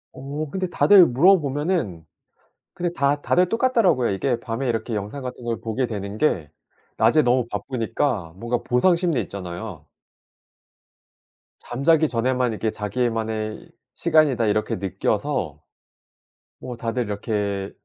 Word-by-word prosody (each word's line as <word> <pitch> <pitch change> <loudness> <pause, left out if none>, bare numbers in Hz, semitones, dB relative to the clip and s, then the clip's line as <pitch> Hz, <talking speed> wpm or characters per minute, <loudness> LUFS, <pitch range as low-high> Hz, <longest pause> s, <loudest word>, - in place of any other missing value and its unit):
어 140 +4 -5
근데 185 +1 -2
다들 185 0 +6
물어보면은 145 - +2 0.7
근데 175 -1 -2
다 145 -1 +1
다들 180 0 +2
똑같더라고요. 225 - +2
이게 120 +5 0
밤에 120 +3 -3
이렇게 115 0 -2
영상 105 +7 -4
같은 125 -1 -7
걸 115 -1 -2
보게 115 +3 -1
되는 100 -1 -5
게 85 - 0 0.5
낮에 120 +8 +4
너무 125 -1 +2
바쁘니까 115 - -2
뭔가 120 +3 -2
보상심리 170 +2 +2
있잖아요. 90 -4 -7 1.7
잠자기 155 +5 +2
전에만 125 -1 0
이게 110 +1 -1
자기만의 110 -1 -3 0.2
시간이다 155 -8 +3
이렇게 105 +1 0
느껴서 95 -1 -2 1.0
뭐 125 -1 -7
다들 115 +1 -2
이렇게 100 -2 -2
120 Hz, 280 characters per minute, -23 LUFS, 110-145 Hz, 1.7 s, 다들